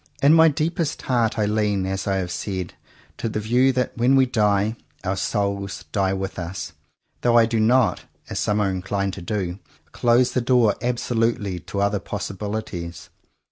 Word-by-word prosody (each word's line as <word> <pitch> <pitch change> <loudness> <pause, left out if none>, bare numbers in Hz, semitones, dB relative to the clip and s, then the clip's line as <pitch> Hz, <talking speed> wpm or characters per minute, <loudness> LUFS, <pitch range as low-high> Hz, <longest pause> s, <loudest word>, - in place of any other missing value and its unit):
In 145 +2 +7
my 165 0 +7
deepest 160 +1 -1
heart 120 -3 +1
I 105 - +2
lean, 105 -2 0
as 95 +1 -3
I 95 - +1
have 90 -2 -2
said, 95 -3 -4 0.4
to 115 - -2
the 110 - -2
view 125 +5 +3
that, 125 0 -1
when 125 +3 +3
we 135 -1 +5
die, 105 -3 +1 0.3
our 95 0 -1
"souls" 100 -1 -2
die 95 -2 +1
with 95 0 -3
us, 90 +2 -5 0.5
though 120 -1 +4
I 115 - +7
do 115 0 -1
not, 120 +2 +3 0.2
as - - -4
some 105 0 +1
are 100 -2 +1
inclined 95 +1 -2
to 95 - -7
do, 95 0 -3 0.3
close 120 +1 +3
the 125 - 0
door 120 -4 +4
absolutely 115 -5 0
to 100 +3 -4
other 100 0 +1
possibilities. 100 -4 -5
105 Hz, 175 wpm, -23 LUFS, 95-120 Hz, 0.5 s, In